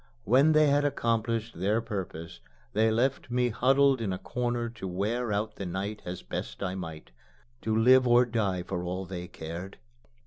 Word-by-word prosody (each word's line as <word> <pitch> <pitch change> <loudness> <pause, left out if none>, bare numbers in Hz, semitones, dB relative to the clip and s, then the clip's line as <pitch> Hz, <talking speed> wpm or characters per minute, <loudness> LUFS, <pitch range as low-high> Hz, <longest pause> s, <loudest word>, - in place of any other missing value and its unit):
When 135 +8 +5
they 155 0 +6
had 145 0 +3
accomplished 115 -6 -1
their 105 +5 +2
purpose, 90 - -6 0.3
they 110 +1 +3
left 125 +4 0
me 125 0 +1
huddled 135 +2 +3
in 105 -4 -1
a 95 - -2
corner 120 +1 -2
to 115 -4 -7
wear 105 +6 -1
out 105 +1 -2
the 100 - -4
night 100 +4 -4
as 90 0 -6
best - - -5
I 90 - -2
might 80 -4 -7 0.5
to 110 0 0
live 125 +3 +6
or 120 +1 +6
die 100 -6 -1
for 90 0 -4
all 90 +2 -3
they 90 -1 -6
cared. 85 +3 -7
110 Hz, 175 wpm, -28 LUFS, 95-120 Hz, 0.5 s, they